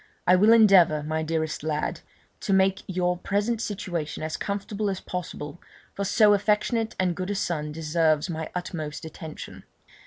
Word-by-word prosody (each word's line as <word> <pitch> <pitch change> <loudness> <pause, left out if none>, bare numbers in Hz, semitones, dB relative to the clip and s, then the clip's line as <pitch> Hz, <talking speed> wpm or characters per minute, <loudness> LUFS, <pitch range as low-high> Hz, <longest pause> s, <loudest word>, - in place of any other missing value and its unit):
I 180 - +6
will 210 +4 +5
endeavour, 190 -9 +6
my 155 +1 -2
dearest 160 0 -2
lad, 155 0 -2 0.4
to 195 - -1
make 190 0 +3
your 180 -1 0
present 210 +5 -1
situation 185 -9 -4
as 155 0 -3
comfortable 200 +1 -3
as 190 -1 -3
possible, 175 -3 -6 0.3
for 200 - -3
so 210 +1 +5
affectionate 210 +3 +1
and 180 -2 +1
good 185 +2 -4
a 205 - -1
son 155 -6 -2
deserves 155 0 +1
my 160 -2 -4
utmost 160 -4 -5
attention. 160 0 -9
180 Hz, 155 wpm, -26 LUFS, 160-200 Hz, 0.4 s, I